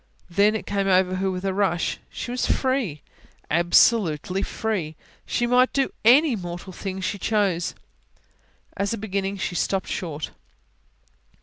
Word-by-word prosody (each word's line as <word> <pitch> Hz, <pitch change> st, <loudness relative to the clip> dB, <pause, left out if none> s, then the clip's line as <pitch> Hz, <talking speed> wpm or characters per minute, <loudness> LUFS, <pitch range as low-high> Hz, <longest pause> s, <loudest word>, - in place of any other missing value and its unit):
Then, 205 Hz, +4 st, +4 dB
it 220 Hz, -, -4 dB
came 200 Hz, -1 st, -1 dB
over 185 Hz, -1 st, +3 dB
her 190 Hz, +1 st, 0 dB
with 185 Hz, 0 st, -4 dB
a 190 Hz, -, 0 dB
rush: 185 Hz, -4 st, 0 dB
she 240 Hz, -, -6 dB
was 250 Hz, -, -1 dB
free, 255 Hz, -, 0 dB, 0.5 s
absolutely 175 Hz, +1 st, +3 dB
free; 190 Hz, -10 st, -2 dB, 0.3 s
she 240 Hz, -, 0 dB
might 250 Hz, +1 st, +3 dB
do 275 Hz, -1 st, 0 dB
any 265 Hz, +4 st, +6 dB
mortal 175 Hz, -1 st, -7 dB
thing 190 Hz, +1 st, -5 dB
she 200 Hz, +1 st, -2 dB
chose. 195 Hz, -5 st, 0 dB, 1.0 s
As 200 Hz, +2 st, -1 dB
a -, -, -8 dB
beginning 200 Hz, -1 st, -2 dB
she 185 Hz, -, -3 dB
stopped 190 Hz, +2 st, -1 dB
short. 155 Hz, -4 st, -4 dB
195 Hz, 140 wpm, -24 LUFS, 180-220 Hz, 1.0 s, any